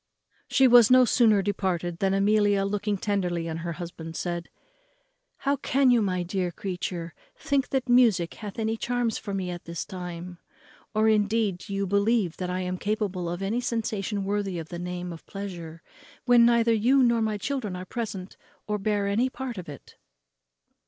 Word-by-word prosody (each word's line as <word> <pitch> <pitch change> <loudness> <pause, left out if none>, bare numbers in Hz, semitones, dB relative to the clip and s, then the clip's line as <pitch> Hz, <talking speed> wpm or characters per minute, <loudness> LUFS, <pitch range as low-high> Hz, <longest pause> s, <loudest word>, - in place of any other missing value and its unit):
She 265 - +4
was 240 -3 +7
no 255 0 +7
sooner 220 -4 +4
departed 180 -4 -2
than 195 0 +2
Amelia, 205 0 +3
looking 205 +1 -1
tenderly 180 -4 -1
on 160 -1 -3
her 170 +1 -4
husband, 165 0 -8
said, 175 0 -3 0.9
"How 280 0 0
can 270 0 +3
you, 240 -2 +4
my 185 -3 0
dear 180 0 -2
creature, 175 -2 -5 0.2
think 280 -1 0
that 265 -1 -1
music 230 -9 +4
hath 205 -3 -8
any 225 0 -1
charms 240 -1 -1
for 200 -2 -5
me 185 -2 -2
at 175 -1 -8
this 170 -1 -5
time? 180 -2 -7 0.6
or, 215 +1 +3
indeed, 210 -3 +2
do 200 - -6
you 200 0 0
believe 200 -2 +1
that 180 -1 -3
I 180 +1 -2
am 180 0 -3
capable 200 -5 -2
of 175 +3 -4
any 220 +5 -1
sensation 215 -4 -2
worthy 200 -3 -1
the 170 +2 -7
name 180 0 -5
of 165 - -11
pleasure 175 -5 -7 0.4
when 240 -2 +6
neither 235 -1 +4
you 250 +5 +4
nor 235 -1 +3
my 215 -1 0
children 225 -4 -3
are 180 0 -6
present 200 -3 -5 0.3
or 210 0 -2
bear 205 0 0
any 220 +6 +1
part 255 -4 -6
of 175 - -9
it?" 145 - -12
200 Hz, 175 wpm, -26 LUFS, 180-225 Hz, 0.9 s, was